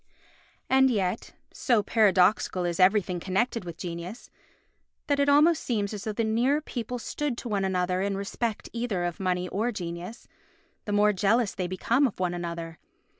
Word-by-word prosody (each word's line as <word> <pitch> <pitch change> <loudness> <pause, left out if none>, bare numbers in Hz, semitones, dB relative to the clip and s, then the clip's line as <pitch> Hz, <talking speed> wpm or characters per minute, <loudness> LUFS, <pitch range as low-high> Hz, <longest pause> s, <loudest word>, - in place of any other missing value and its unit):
And 265 0 +5
yet, 200 -3 -1 0.2
so 235 -6 +2
paradoxical 190 -4 +3
is 175 0 -2
everything 185 -1 +3
connected 195 +5 -1
with 170 -2 -8
genius, 175 +6 -7 0.7
that 285 -1 0
it 280 0 +3
almost 300 +3 +5
seems 210 -4 -1
as 205 -1 -6
though 215 - -1
the 230 +2 -1
nearer 240 +7 +2
people 245 -5 -5
stood 260 +2 -3
to 245 - -6
one 205 -3 -1
another 185 -1 0
in 195 0 -1
respect 215 +3 -3
either 230 -6 -2
of 175 -1 -3
money 180 -1 -1
or 225 +5 -1
genius, 180 +2 -7 0.6
the 205 - -3
more 210 0 +4
jealous 205 +2 +2
they 185 -2 -3
become 235 +9 +2
of 215 - -9
one 180 -1 0
another. 170 -1 -5
205 Hz, 170 wpm, -27 LUFS, 180-235 Hz, 0.7 s, And